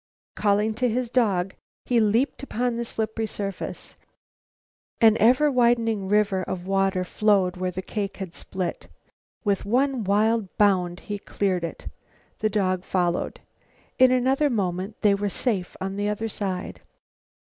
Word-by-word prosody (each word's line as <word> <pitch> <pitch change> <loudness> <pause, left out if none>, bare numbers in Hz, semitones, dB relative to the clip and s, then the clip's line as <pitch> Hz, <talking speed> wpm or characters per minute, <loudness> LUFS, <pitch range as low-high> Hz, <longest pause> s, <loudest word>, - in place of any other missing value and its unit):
Calling 210 +1 +2
to 245 +3 0
his 240 +1 -2
dog, 195 -7 +1 0.3
he 245 -2 +2
leaped 225 +5 +1
upon 245 -3 -1
the 235 - -2
slippery 220 0 -2
surface. 200 -3 -5 1.1
An 225 -2 +6
ever 255 +7 +5
widening 230 -5 +2
river 205 -1 +2
of 180 -1 -5
water 195 -1 +1
flowed 195 -1 +2
where 185 0 -2
the 185 +1 -5
cake 200 0 -4
had 190 -3 -6
split. 185 -2 -5 0.6
With 200 -3 +1
one 255 +3 +1
wild 210 +1 +1
bound, 185 -4 +2
he 205 -1 -5
cleared 190 -3 -1
it. 170 - -6 0.5
The 215 - +1
dog 185 -3 0
followed. 175 -3 -1 0.6
In 255 0 +7
another 265 +3 +2
moment 195 -2 -2
they 205 -1 +5
were 200 +1 -1
safe 195 -4 -2
on 195 +1 -4
the 205 0 0
other 220 +2 -2
side. 190 -3 -4
205 Hz, 145 wpm, -25 LUFS, 190-230 Hz, 1.1 s, In